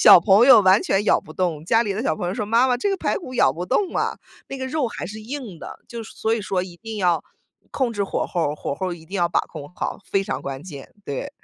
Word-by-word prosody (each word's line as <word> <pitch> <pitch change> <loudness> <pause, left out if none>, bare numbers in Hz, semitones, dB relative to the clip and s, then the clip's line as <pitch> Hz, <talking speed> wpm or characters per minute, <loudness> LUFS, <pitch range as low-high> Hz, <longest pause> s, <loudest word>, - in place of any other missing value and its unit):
小 - - +10
朋 200 +7 +5
友 240 -6 +9
完 190 +3 +5
全 195 +2 +1
咬 - - +4
不 155 - -16
动， 170 -5 -1
家 225 +5 +4
里 205 -3 -2
的 215 - -3
小 155 - 0
朋 175 - -3
友 180 - -1
说： 210 - -3
“妈 235 +3 +4
妈， 250 - +2
这 405 - 0
个 390 - 0
排 - - -1
骨 255 -9 -9
咬 - - +4
不 175 +3 -5
动 360 - 0
啊。 - - 0 0.3
“那 270 - -5
个 260 - -4
肉 270 -2 -1
还 - - -6
是 215 +3 -8
硬 230 - -7
的， - - -9
就 235 -1 -7
所 225 0 -2
以 230 - -2
说 190 -3 -1
一 175 -2 -10
定 225 +1 -7
要 180 -4 +2 0.5
控 255 -4 -1
制 205 - -1
火 195 - -2
候 165 -5 -1
儿， - - -5
火 140 - -4
候 185 - -3
儿 175 - -3
一 160 -1 -14
定 190 - -11
要 175 -3 +2
把 - - +2
控 145 -1 -10
好。 - - -3
非 195 0 +1
常 - - -3
关 135 +1 -6
键， 145 -7 -9 0.2
对。 140 -2 -4
200 Hz, 305 characters per minute, -22 LUFS, 175-235 Hz, 0.5 s, 小